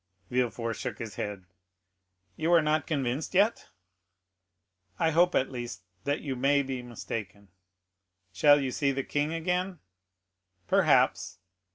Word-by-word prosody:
Villefort 120 -2 0
shook - - -4
his 115 -4 -6
head. 100 -3 -5 0.9
"You 160 +2 0
are 170 - +7
not 155 0 +1
convinced 140 +1 -2
yet?" 205 +5 +2 1.3
"I 160 - +2
hope 175 +3 +3
at 130 - +1
least, 120 -5 -6 0.2
that 145 +2 0
you 135 -3 -3
may 140 +3 +2
be 130 -2 -4
mistaken." 105 -4 -7 0.8
"Shall 145 +9 +6
you 135 -2 -2
see 140 +2 +1
the 135 0 -2
king 145 +3 -1
again?" 180 +3 -1 0.9
"Perhaps." - - +3
140 Hz, 130 wpm, -29 LUFS, 120-160 Hz, 1.3 s, are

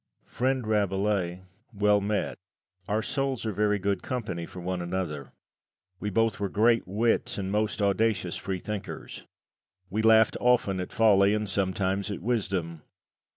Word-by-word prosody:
Friend 130 -1 -1
Rabelais, 100 -3 0 0.3
well 105 -1 +3
met 100 -1 -2 0.5
our 110 +2 0
souls 135 -4 -1
are 110 - 0
very 105 +1 +1
good 100 -1 -1
company 105 -10 -4
for 90 - -10
one 90 0 -3
another; 85 -5 -4 0.7
we 105 - -2
both 115 +1 +1
were 100 -1 -1
great 115 +3 +3
wits 115 +5 0
and 95 -1 -3
most 105 0 0
audacious 100 -2 +1
freethinkers. 95 +2 -6 0.6
We 105 +3 0
laughed 110 0 +5
often 120 -6 +2
at 90 - -4
folly, 100 -2 +4
and 105 0 -2
sometimes 95 +1 -1
at 100 - -4
wisdom. 95 -8 -1
100 Hz, 140 wpm, -27 LUFS, 95-110 Hz, 0.7 s, laughed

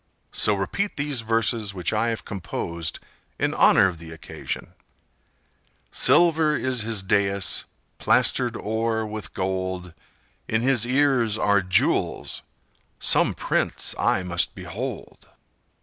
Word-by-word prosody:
So 105 - +3
repeat 195 - -3
these 145 -4 -1
verses 115 -2 0
which 90 +1 -2
I 110 +2 +1
have 115 -1 -3
composed 85 -3 -4 0.4
in - - 0
honor - - +5
of 85 -4 -5
the 80 0 -11
occasion: 80 0 -7 1.2
'Silver 160 -3 +4
is 130 -4 -1
his 110 -2 0
dais, 100 -1 +1 0.3
plastered - - +2
o'er 110 +1 -2
with 105 0 -7
gold; 95 -2 -3 0.5
In 110 +1 0
his 125 -3 +2
ears 130 -5 +2
are 100 -2 +2
jewels,—some 95 -1 0
prince - - -1
I 95 - +1
must 90 -1 +1
behold! - - -7
105 Hz, 115 wpm, -24 LUFS, 95-120 Hz, 1.2 s, honor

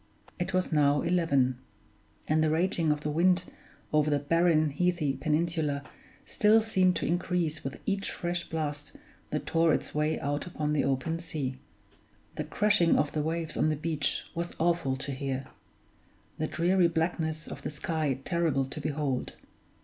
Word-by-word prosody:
It 175 +1 -2
was 185 -1 0
now 145 -2 +3
eleven; 140 -8 +2 0.7
and 155 +1 +3
the 155 - +3
raging 165 0 +2
of 150 0 -1
the 150 - -2
wind 180 +3 +3 0.5
over 150 0 +3
the 145 - +3
barren, 155 +1 +2
heathy 170 -2 +1
peninsula 150 0 0 0.4
still 215 +1 +4
seemed 185 -5 +2
to - - -1
increase 175 -3 -1
with 135 - -5
each 200 0 -1
fresh 175 0 -3
blast 150 -2 -3 0.4
that - - -3
tore 165 0 +3
its - - -5
way 150 +1 0
out 145 +3 -2
upon 150 -3 -2
the 145 - +2
open 140 +5 -1
sea; 145 -6 -4 0.8
the - - -2
crashing 205 -5 +3
of 150 - +1
the 155 - -1
waves 160 +1 -2
on 155 - +2
the 155 - +1
beach 155 -1 -1
was 170 +1 -4
awful 170 -5 +1
to 135 +2 -5
hear; 135 0 -3 0.9
the 155 - 0
dreary 175 +3 +3
blackness 160 -1 -1
of - - -8
the - - -4
sky 150 -2 -1
terrible 165 -6 +1
to 145 +3 -7
behold. 145 -3 -2
155 Hz, 160 wpm, -29 LUFS, 145-170 Hz, 0.9 s, still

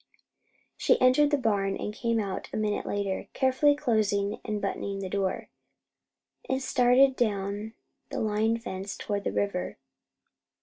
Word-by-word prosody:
She - - +3
entered 255 +4 +5
the 290 - +2
barn, 200 -6 0
and 210 - -4
came 230 0 0
out 195 -3 -4
a - - -3
minute 215 -1 -1
later, 200 -2 -2
carefully 265 +2 +3
closing 215 -7 0
and 210 -2 -2
buttoning 200 -1 -3
the 195 -1 -4
door, 195 -2 -1 1.0
and 265 - +1
started 260 0 +4
down 205 -1 -2 0.3
the - - -3
line 220 +1 +1
fence 195 -4 -6
toward 205 -1 -3
the - - 0
river. 200 -3 -2
215 Hz, 140 wpm, -28 LUFS, 200-255 Hz, 1.0 s, entered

